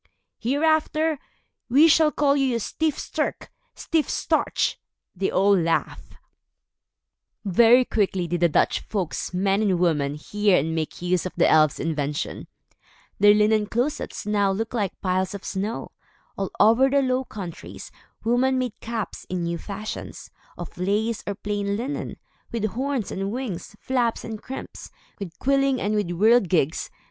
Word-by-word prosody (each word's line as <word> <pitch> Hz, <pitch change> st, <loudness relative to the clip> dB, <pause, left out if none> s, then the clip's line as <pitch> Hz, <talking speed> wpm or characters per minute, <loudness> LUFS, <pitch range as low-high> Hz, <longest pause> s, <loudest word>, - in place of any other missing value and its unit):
"Hereafter, 310 Hz, +3 st, +1 dB, 0.5 s
we 285 Hz, +7 st, +6 dB
shall 315 Hz, -1 st, +5 dB
call 280 Hz, 0 st, +2 dB
you 270 Hz, -3 st, +1 dB
Styf 305 Hz, +6 st, -1 dB
Sterk, -, -, -3 dB, 0.3 s
Stiff 320 Hz, -3 st, -1 dB
Starch." -, -, 0 dB, 0.4 s
They 190 Hz, +1 st, 0 dB
all 200 Hz, +2 st, +4 dB
laughed. 165 Hz, -2 st, -1 dB, 1.3 s
Very 235 Hz, +6 st, +5 dB
quickly 195 Hz, -5 st, 0 dB
did 175 Hz, +1 st, -1 dB
the 170 Hz, -, +5 dB
Dutch -, -, +2 dB
folks, 190 Hz, -6 st, -3 dB
men 195 Hz, +3 st, +1 dB
and 195 Hz, -4 st, +2 dB
women, 150 Hz, -5 st, +1 dB
hear 205 Hz, +5 st, +1 dB
and 160 Hz, +3 st, 0 dB
make 160 Hz, +1 st, -4 dB
use 180 Hz, 0 st, +1 dB
of -, -, -9 dB
the -, -, +4 dB
elves' 155 Hz, -2 st, +4 dB
invention. 150 Hz, -1 st, -3 dB, 0.7 s
Their 205 Hz, +1 st, +7 dB
linen 210 Hz, 0 st, +3 dB
closets 245 Hz, +3 st, -2 dB
now 205 Hz, -2 st, +2 dB
looked 225 Hz, +4 st, -3 dB
like 205 Hz, -6 st, -2 dB
piles 185 Hz, +1 st, 0 dB
of 200 Hz, -, -8 dB
snow. 205 Hz, +4 st, -3 dB, 0.4 s
All 195 Hz, -1 st, -3 dB
over 230 Hz, +6 st, +5 dB
the 280 Hz, 0 st, +3 dB
Low 255 Hz, 0 st, +1 dB
Countries, 190 Hz, -9 st, -8 dB, 0.3 s
women 250 Hz, +3 st, +2 dB
made 250 Hz, -3 st, -3 dB
caps, 230 Hz, -2 st, -5 dB
in 180 Hz, -1 st, -2 dB
new 170 Hz, 0 st, -2 dB
fashions, 210 Hz, +3 st, -7 dB, 0.3 s
of 175 Hz, 0 st, -8 dB
lace 210 Hz, +4 st, 0 dB
or 200 Hz, -, -2 dB
plain 205 Hz, 0 st, -2 dB
linen, 265 Hz, +6 st, -4 dB, 0.3 s
with 230 Hz, -2 st, -1 dB
horns 260 Hz, -2 st, -2 dB
and 195 Hz, +1 st, -3 dB
wings, 230 Hz, -6 st, -5 dB
flaps 245 Hz, -3 st, 0 dB
and 220 Hz, -1 st, -6 dB
crimps, 265 Hz, -, -8 dB, 0.3 s
with 175 Hz, -4 st, -7 dB
quilling 275 Hz, -1 st, +2 dB
and 205 Hz, +2 st, -1 dB
with 210 Hz, -3 st, 0 dB
whirligigs. 180 Hz, -, +2 dB
210 Hz, 145 wpm, -24 LUFS, 185-250 Hz, 1.3 s, Their